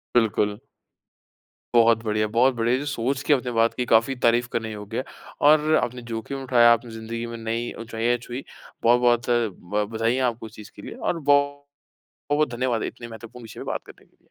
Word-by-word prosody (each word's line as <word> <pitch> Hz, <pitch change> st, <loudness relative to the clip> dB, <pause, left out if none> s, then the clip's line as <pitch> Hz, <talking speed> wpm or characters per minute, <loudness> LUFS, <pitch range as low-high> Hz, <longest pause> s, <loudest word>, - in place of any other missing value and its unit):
बिल्कुल। 105 Hz, -3 st, +2 dB, 1.2 s
बहुत 115 Hz, -1 st, +5 dB
बढ़िया, 110 Hz, 0 st, 0 dB
बहुत 125 Hz, +4 st, +3 dB
बढ़िया 120 Hz, +1 st, +1 dB
है। -, -, +1 dB
जो 145 Hz, -, -5 dB
सोच 135 Hz, 0 st, -1 dB
की 150 Hz, -, +1 dB
अपने 125 Hz, -3 st, +1 dB
बात 115 Hz, +1 st, +3 dB
की 125 Hz, -, -1 dB
काफ़ी 115 Hz, +4 st, +4 dB
तारीफ़ 120 Hz, +1 st, +3 dB
करने 110 Hz, -1 st, -2 dB
योग्य 105 Hz, +2 st, -7 dB
है 130 Hz, -, -2 dB, 0.4 s
और 155 Hz, +1 st, +4 dB
आपने 125 Hz, 0 st, -4 dB
जोख़िम 135 Hz, +5 st, -5 dB
उठाया, 120 Hz, -2 st, +5 dB
आपने 115 Hz, 0 st, -1 dB
ज़िंदगी 115 Hz, +1 st, -6 dB
में 115 Hz, -, -6 dB
नई 115 Hz, +1 st, -3 dB
ऊँचाई 115 Hz, +1 st, -1 dB
छुई, 125 Hz, +3 st, -7 dB, 0.4 s
बहुत-बहुत 120 Hz, 0 st, +3 dB
अ, 120 Hz, -2 st, +2 dB
ब 105 Hz, +3 st, -3 dB
बधाईयाँ 115 Hz, +3 st, +1 dB
है 120 Hz, -, +1 dB
आपको 115 Hz, 0 st, -10 dB
उस 110 Hz, -, -14 dB
चीज़ 105 Hz, 0 st, -11 dB
के 100 Hz, -, -11 dB
लिए -, -, -8 dB
और 170 Hz, -, -2 dB
बौ 145 Hz, -1 st, +5 dB, 0.9 s
बहुत-बहुत 150 Hz, -1 st, +2 dB
धन्यवाद 120 Hz, -2 st, 0 dB
है -, -, -2 dB
इतने 120 Hz, -, -9 dB
महत्वपूर्ण 115 Hz, +1 st, -11 dB
विषय 110 Hz, -, -11 dB
पे -, -, -5 dB
बात -, -, -3 dB
करने -, -, -16 dB
के -, -, -33 dB
लिए। -, -, -35 dB
120 Hz, 210 wpm, -24 LUFS, 115-125 Hz, 1.2 s, बहुत